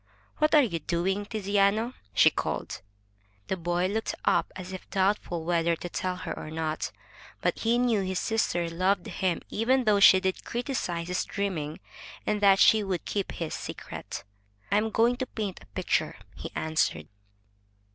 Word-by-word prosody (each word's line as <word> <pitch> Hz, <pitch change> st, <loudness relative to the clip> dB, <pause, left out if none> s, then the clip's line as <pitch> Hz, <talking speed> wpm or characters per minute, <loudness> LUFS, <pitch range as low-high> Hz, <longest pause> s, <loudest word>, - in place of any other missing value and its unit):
"What 305 Hz, 0 st, +4 dB
are 295 Hz, -, +7 dB
you 170 Hz, -9 st, -1 dB
doing, 185 Hz, +6 st, -1 dB
Tiziano?" 210 Hz, +2 st, +1 dB, 0.2 s
she -, -, +7 dB
called. -, -, -3 dB, 0.7 s
The -, -, +1 dB
boy 175 Hz, 0 st, 0 dB
looked 215 Hz, +4 st, -1 dB
up -, -, +2 dB
as 185 Hz, 0 st, -7 dB
if 185 Hz, -, -8 dB
doubtful 190 Hz, -4 st, 0 dB
whether 170 Hz, -1 st, +2 dB
to 175 Hz, -, -7 dB
tell 180 Hz, +1 st, -3 dB
or -, -, -5 dB
not. 160 Hz, 0 st, -2 dB, 0.5 s
But -, -, 0 dB
he 230 Hz, +1 st, +2 dB
knew 240 Hz, -4 st, +2 dB
his 190 Hz, -1 st, -2 dB
sister 180 Hz, -6 st, 0 dB
loved 185 Hz, +2 st, +1 dB
him 185 Hz, -3 st, -1 dB
even 255 Hz, +4 st, +2 dB
though 210 Hz, -3 st, +4 dB
she 190 Hz, -1 st, +8 dB
did 190 Hz, 0 st, -2 dB
criticize 235 Hz, -9 st, -3 dB
his 180 Hz, 0 st, 0 dB
dreaming, 165 Hz, -7 st, -3 dB, 0.4 s
and 210 Hz, -1 st, 0 dB
that 195 Hz, -1 st, +6 dB
she 215 Hz, +2 st, +6 dB
would 185 Hz, -4 st, -3 dB
keep 200 Hz, -2 st, -2 dB
his 165 Hz, -2 st, -4 dB
secret. -, -, -6 dB, 0.5 s
"I 200 Hz, -, +4 dB
am 220 Hz, +1 st, +1 dB
going 235 Hz, +3 st, +3 dB
to 260 Hz, -, -3 dB
paint 205 Hz, -6 st, -4 dB
a -, -, -16 dB
picture,'' 100 Hz, -, -1 dB, 0.2 s
he -, -, -6 dB
answered. 160 Hz, 0 st, 0 dB
190 Hz, 165 wpm, -28 LUFS, 175-215 Hz, 0.7 s, she